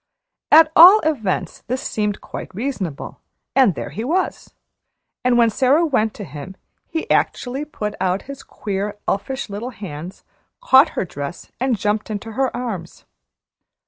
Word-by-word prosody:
At 315 Hz, 0 st, +8 dB
all 365 Hz, +6 st, +10 dB
events 215 Hz, -, -2 dB
this 255 Hz, +3 st, -2 dB
seemed 210 Hz, -2 st, -2 dB
quite -, -, -8 dB
reasonable, 205 Hz, -, -4 dB, 0.4 s
and 255 Hz, -, +5 dB
there -, -, -5 dB
he 220 Hz, -, -5 dB
was; 350 Hz, +9 st, -2 dB, 0.7 s
and 250 Hz, -1 st, +3 dB
when 230 Hz, -1 st, +4 dB
Sara 275 Hz, +8 st, +3 dB
went 225 Hz, -8 st, 0 dB
to 210 Hz, -, -7 dB
him, 150 Hz, +3 st, -9 dB, 0.3 s
he 320 Hz, -, -4 dB
actually 265 Hz, +4 st, 0 dB
put 210 Hz, -8 st, -5 dB
out 185 Hz, +1 st, 0 dB
his 275 Hz, 0 st, -9 dB
queer, 205 Hz, 0 st, -4 dB
elfish 260 Hz, +8 st, -2 dB
little 210 Hz, +4 st, -5 dB
hands, 185 Hz, -, -8 dB, 0.4 s
caught 305 Hz, -, +6 dB
her -, -, 0 dB
dress, 145 Hz, 0 st, -7 dB
and 255 Hz, -2 st, +1 dB
jumped 210 Hz, +2 st, -1 dB
into 215 Hz, +1 st, -5 dB
her 260 Hz, +3 st, 0 dB
arms. 205 Hz, -9 st, -6 dB
220 Hz, 145 wpm, -20 LUFS, 195-270 Hz, 0.7 s, all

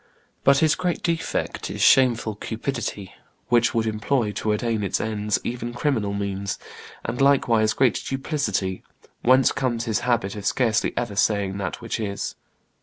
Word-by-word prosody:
But 140 Hz, 0 st, +5 dB
his 155 Hz, -, +4 dB
great 180 Hz, -2 st, -2 dB
defect 165 Hz, -1 st, -2 dB
is -, -, -6 dB
shameful 120 Hz, -4 st, +4 dB
cupidity, 110 Hz, -2 st, -4 dB, 0.4 s
which 120 Hz, 0 st, +3 dB
would 115 Hz, -1 st, +2 dB
employ, 110 Hz, +1 st, 0 dB
to 105 Hz, +1 st, -1 dB
attain 110 Hz, +1 st, 0 dB
its 100 Hz, -, -1 dB
ends, 105 Hz, -1 st, -1 dB
even 120 Hz, 0 st, -4 dB
criminal 120 Hz, -6 st, 0 dB
means, 100 Hz, 0 st, -3 dB, 0.5 s
and 125 Hz, -, -2 dB
likewise 120 Hz, -6 st, +4 dB
great 130 Hz, -3 st, +2 dB
duplicity, 135 Hz, -, -2 dB, 0.4 s
whence 130 Hz, +1 st, +5 dB
comes 120 Hz, -3 st, -1 dB
his 110 Hz, -3 st, 0 dB
habit 120 Hz, -5 st, 0 dB
of 105 Hz, -1 st, -4 dB
scarcely 115 Hz, -1 st, +1 dB
ever 120 Hz, -4 st, -2 dB
saying 100 Hz, -1 st, +1 dB
that 100 Hz, -, -4 dB
which 115 Hz, 0 st, -3 dB
is. 100 Hz, -2 st, -3 dB
115 Hz, 150 wpm, -24 LUFS, 105-130 Hz, 0.5 s, But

